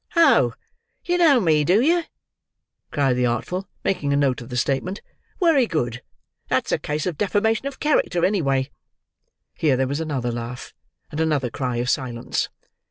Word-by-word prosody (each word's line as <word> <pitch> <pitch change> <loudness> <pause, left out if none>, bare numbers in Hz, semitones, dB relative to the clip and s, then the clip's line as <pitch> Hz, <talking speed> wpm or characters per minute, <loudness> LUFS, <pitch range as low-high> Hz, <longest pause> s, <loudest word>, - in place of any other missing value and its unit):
"Oh! 335 -1 +5 0.5
you 355 0 +1
know 305 -7 +6
me, 155 -7 +3
do 180 +7 +4
you?" 335 +7 +3 0.9
cried 135 -3 +1
the 125 0 +2
Artful, 180 - -2 0.2
making 145 -7 0
a - - +3
note 135 -3 +1
of 120 - -10
the 125 - -4
statement. 140 - -1 0.4
"Wery 320 - +4
good. 120 - -2 0.5
That's - - 0
a - - +1
case 150 +1 -3
of 175 -5 -3
deformation 220 +5 +1
of 275 -1 -7
character, 245 - +2
any 200 -1 +1
way." 135 -1 0 0.8
Here 145 -5 +1
there 130 0 +1
was 140 +3 -2
another 140 -7 -2
laugh, 120 +1 -6 0.4
and 150 - -5
another 150 -6 0
cry 125 -1 -2
of 120 +1 -1
silence. 125 -3 -1
150 Hz, 165 wpm, -23 LUFS, 125-205 Hz, 0.9 s, know